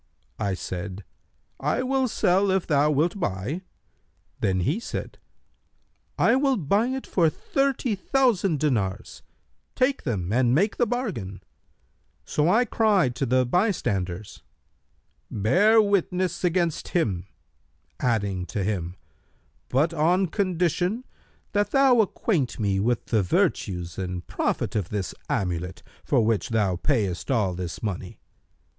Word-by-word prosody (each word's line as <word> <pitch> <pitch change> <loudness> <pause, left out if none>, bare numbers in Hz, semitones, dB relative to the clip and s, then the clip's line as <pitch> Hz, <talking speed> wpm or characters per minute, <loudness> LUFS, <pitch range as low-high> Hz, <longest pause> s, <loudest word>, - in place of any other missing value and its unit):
I 100 -3 0
said, 95 +2 -6 0.6
'I 150 - 0
will 265 0 +1
sell 195 -2 +2
if 190 -1 +1
thou 150 -1 +3
wilt 160 +7 +1
buy;' 115 - -2 0.8
then 95 -1 +1
he 145 - 0
said, - - -6 1.0
'I 235 - +4
will 270 -2 +2
buy 200 - +1
it 265 +1 -3
for 170 -4 +2
thirty 270 - -1
thousand 200 - +1
dinars; 110 -8 -1 0.5
take 265 +1 +1
them 100 -7 -2
and 125 0 +3
make 200 +7 +1
the 240 - +2
bargain;' 190 - -4 0.8
so 150 +2 +1
I 235 +6 +4
cried 205 - +2
to 135 - -1
the 130 +1 +3
bystanders, 110 - -1 0.9
'Bear 185 - +4
witness 185 -3 +1
against 175 -2 0
him,' 95 - -1 0.7
adding 100 -6 0
to 100 - -2
him, 90 -4 -2 0.7
'But 150 +6 +2
on 175 +4 +2
condition 180 - 0 0.5
that 205 0 +1
thou 265 -2 +5
acquaint 180 - -1
me 100 -3 +1
with 120 +3 0
the 110 -3 +2
virtues 90 -1 -1
and 90 -1 -4
profit - - -2
of 100 -5 -1
this 100 -3 -3 0.2
amulet 90 -1 -2 0.2
for 110 - +2
which 110 -6 0
thou 105 -5 +1
payest 100 - -1
all 105 -8 +1
this 90 +2 -6
money.' 100 -5 -4
145 Hz, 125 wpm, -25 LUFS, -, 1.0 s, thou